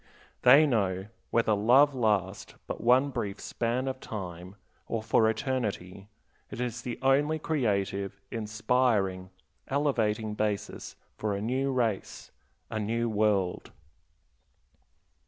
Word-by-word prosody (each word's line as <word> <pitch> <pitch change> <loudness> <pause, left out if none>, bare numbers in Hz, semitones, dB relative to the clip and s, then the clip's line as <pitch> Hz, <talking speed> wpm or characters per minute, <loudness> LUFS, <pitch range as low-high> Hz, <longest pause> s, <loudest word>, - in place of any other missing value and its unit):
They 140 +5 +7
know, 100 -7 0 0.2
whether 115 -2 +2
love 125 +8 +5
last 105 -6 -1
but - - -5
one 130 +4 +4
brief 105 -6 -4
span 120 +3 -2
of 130 0 -3
time 90 -4 -7 0.3
or 115 -2 -3
for 110 0 +3
eternity, 105 -6 -3 0.4
it - - -8
is 120 -1 -3
the 120 -1 -5
only 145 +4 +3
creative, 100 -10 -1
inspiring, 110 -4 0 0.4
elevating 115 -7 0
basis 105 -1 -3 0.2
for 105 -2 -1
a - - -3
new 130 +5 0
race, 115 -6 -2 0.4
a 110 - -2
new 115 +3 -1
world. 105 -4 0
110 Hz, 115 wpm, -29 LUFS, 100-125 Hz, 0.4 s, They